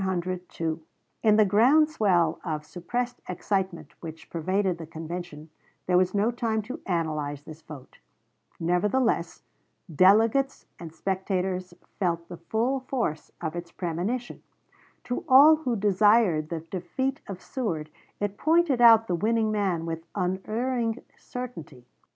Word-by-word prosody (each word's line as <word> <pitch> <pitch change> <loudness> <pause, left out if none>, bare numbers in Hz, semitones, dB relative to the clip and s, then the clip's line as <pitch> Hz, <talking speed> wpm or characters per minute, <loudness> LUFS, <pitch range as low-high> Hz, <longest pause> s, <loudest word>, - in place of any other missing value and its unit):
In 215 -2 +5
the 215 0 +5
groundswell 215 - +3
of 155 -3 -3
suppressed 240 +10 -4
excitement 190 -1 -2
which 160 -1 -10
pervaded 185 +2 0
the 165 - -7
convention 160 -1 -7 0.3
there 180 - +1
was 185 +2 +3
no 210 +4 +2
time 225 -3 -1
to 245 +5 -7
analyze 155 -5 -2
this 155 0 -11
vote; 145 -5 -12 0.6
nevertheless, 180 +3 0 0.5
delegates 220 - +4
and 165 -2 -8
spectators 185 +1 -2 0.2
felt 170 -2 -1
the 175 - -7
full 230 +10 -1
force 245 - -3
of 160 -1 -3
its 175 -1 -6
premonition; 185 +9 -3 0.6
to 245 - -3
all 290 +4 +8
who 255 -6 -2
desired 205 -5 +3
the 165 -2 -3
defeat 185 - -3
of 195 -3 -6
Seward 165 - -4 0.3
it 205 0 -3
pointed 320 -5 +3
out 225 -2 +8
the 185 - -2
winning 220 +4 +1
man 190 -6 0
with, 165 0 -4
unerring 225 +6 -1 0.2
certainty. 165 - -8
190 Hz, 125 wpm, -26 LUFS, 170-230 Hz, 0.6 s, all